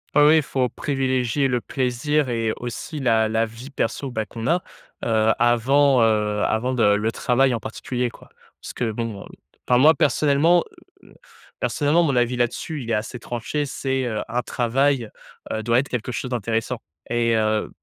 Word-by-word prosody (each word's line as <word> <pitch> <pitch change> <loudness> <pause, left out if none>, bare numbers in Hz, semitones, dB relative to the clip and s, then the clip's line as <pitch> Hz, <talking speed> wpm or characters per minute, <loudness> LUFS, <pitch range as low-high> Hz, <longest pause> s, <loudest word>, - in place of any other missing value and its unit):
Oh 150 - +6
oui, 155 +1 +6
faut 130 -3 -1
privilégier 135 -2 0
le 125 -2 0
plaisir 130 +4 -1
et 115 -2 0
aussi 120 +6 -6
la 115 -4 +2
la 110 +1 +1
vie 115 +4 -10
perso, 135 0 -2
bah, 110 -3 -3
qu'on 115 +2 -6
a. 175 +2 +2 0.4
Heu, 110 -1 +3
avant, 130 +3 +3
heu, 105 -2 +1
avant 120 +4 0
de 125 - 0
le 110 +2 0
travail 125 +2 +2
en 115 - -1
particulier 120 +3 -3
quoi. - - -16 0.3
Parce - - -9
que 120 - -2
bon, 110 -2 -4
heu, - - -10 0.4
enfin 125 - +4
moi 150 +5 +7
personnellement, 155 +4 +3 0.4
heu, - - -18
m - - -18 0.5
personnellement 150 +3 +2
mon 145 -6 +1
avis 120 0 +1
là-dessus, 130 +5 -2
il 115 - -7
est - - +1
assez 110 +3 -4
tranché, 125 +5 -3
c'est, 135 -1 -2
heu, 110 -3 -2
un 120 +2 -1
travail, 125 0 0 0.4
heu, 110 - -2
doit 115 +2 +2
être 140 +2 0
quelque 125 0 -3
chose 125 +2 -4
d'intéressant 115 +1 -2 0.3
et 115 -1 +2
heu, 110 -1 0
125 Hz, 180 wpm, -22 LUFS, 115-135 Hz, 0.5 s, moi